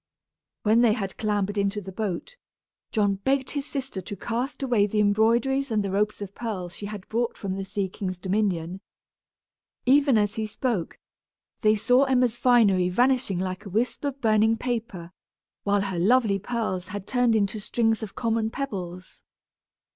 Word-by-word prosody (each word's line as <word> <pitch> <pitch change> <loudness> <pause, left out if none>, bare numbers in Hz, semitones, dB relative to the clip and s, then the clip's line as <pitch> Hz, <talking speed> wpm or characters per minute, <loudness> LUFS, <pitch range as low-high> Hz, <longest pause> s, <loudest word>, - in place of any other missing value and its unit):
When 220 +2 +4
they 230 -3 +5
had 195 -4 -4
clambered 205 -1 0
into 200 +1 0
the 195 -1 -8
boat, 210 - -4 0.6
John 205 -2 +1
begged 265 +5 0
his 285 -1 -3
sister 265 -8 -4
to 205 - -6
cast 245 +8 -3
away 235 -6 +3
the 210 +1 -1
embroideries 230 +6 +2
and 215 -2 +1
the 195 - -3
ropes 205 +1 0
of 200 -1 -9
pearl 200 -7 -4
she 190 +4 -7
had 205 -2 -8
brought 235 +1 -1
from 195 -3 -3
the 195 0 -4
sea 200 0 -2
king's 185 0 -5
dominion. 185 -2 -1 1.0
Even 275 -1 +5
as 205 0 +1
he 220 -1 -3
spoke, 215 -5 -2 0.6
they 215 0 +4
saw 245 +6 +4
Emma's 250 -3 +2
finery 210 -8 +4
vanishing 245 -1 +2
like 185 +2 -3
a 200 - -8
wisp 230 +6 -1
of 280 -1 -3
burnt 220 0 +3
paper, 220 -8 -4 0.5
while 200 0 +2
her 190 -3 -2
lovely 210 +1 +3
pearls 200 -4 -3
had 205 -1 -6
turned 245 -2 +2
into 210 0 0
strings 225 +1 0
of 215 -3 -7
common 225 -1 0
pebbles. 185 -9 -6
215 Hz, 165 wpm, -26 LUFS, 195-240 Hz, 1.0 s, they